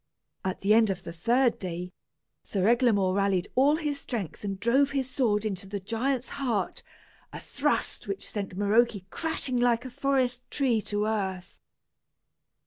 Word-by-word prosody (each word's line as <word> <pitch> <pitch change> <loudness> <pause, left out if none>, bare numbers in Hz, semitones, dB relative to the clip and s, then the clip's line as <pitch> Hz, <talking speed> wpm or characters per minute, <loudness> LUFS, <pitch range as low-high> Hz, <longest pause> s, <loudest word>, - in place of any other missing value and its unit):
At 190 -1 -3
the 200 +2 +4
end 220 -1 +5
of 190 -2 -3
the 170 - -7
third 240 +8 +2
day, 180 -1 -5 0.5
Sir 195 -1 0
Eglamour 225 -6 +3
rallied 195 -2 +1
all 280 +4 +4
his 295 -3 -2
strength 215 - -5
and 195 -2 -3
drove 260 +6 +3
his 270 -2 -1
sword 225 -6 +1
into 195 -2 -3
the 200 +1 -4
giant's 245 +6 -1
heart, 240 -8 -2 0.5
a - - -7
thrust - - -1
which 395 - -4
sent 195 -3 -5
Maroke 205 -1 +2
crashing 300 -6 -1
like 240 0 +2
a 255 - -6
forest 260 -2 0
tree 250 -6 +1
to 205 0 -1
earth. 190 -4 -3
220 Hz, 155 wpm, -28 LUFS, 195-255 Hz, 0.5 s, end